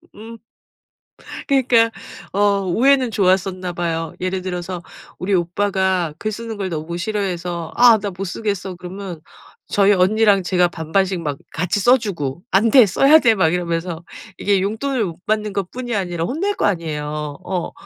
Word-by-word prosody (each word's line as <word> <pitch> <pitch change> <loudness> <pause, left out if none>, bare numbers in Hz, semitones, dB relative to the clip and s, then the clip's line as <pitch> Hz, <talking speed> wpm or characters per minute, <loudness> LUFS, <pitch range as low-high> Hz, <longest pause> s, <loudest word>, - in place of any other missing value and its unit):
음. 225 +2 -10 1.1
그러니까 245 -5 +3 0.4
어 200 0 +2
우애는 255 +6 +3
좋았었나 185 -2 +1
봐요. 165 -2 -3
예를 185 0 -2
들어서 180 -1 -5 0.4
우리 195 +2 -1
오빠가 185 -1 0
글 215 - -2
쓰는 225 0 -6
걸 195 -2 -3
너무 165 +1 -4
싫어해서 175 -4 -3
"아 240 -2 +7
나 205 0 -4
못 190 +2 -5
쓰겠어" 195 -1 -3
그러면 180 -1 -8 0.5
저희 205 0 +4
언니랑 200 +1 +3
제가 180 0 +2
반반씩 175 +2 -1
막 145 -3 -3 0.2
같이 180 +5 -1
써 245 +6 +5
주고 170 - -4
"안돼. 225 +5 +6
써야 275 - +5
돼." 230 -6 +4
막 165 -5 +2
이러면서. 170 -1 -2 0.3
이게 200 -2 +1
용돈을 225 +4 -1
못 175 0 -9
받는 215 -1 -1
것 195 -3 -3
뿐이 245 -2 -4
아니라 175 -4 -2
혼낼 380 - -1
거 - - 0
아니에요. 150 -5 -2
어 180 -3 -3
190 Hz, 310 characters per minute, -20 LUFS, 175-215 Hz, 1.1 s, 아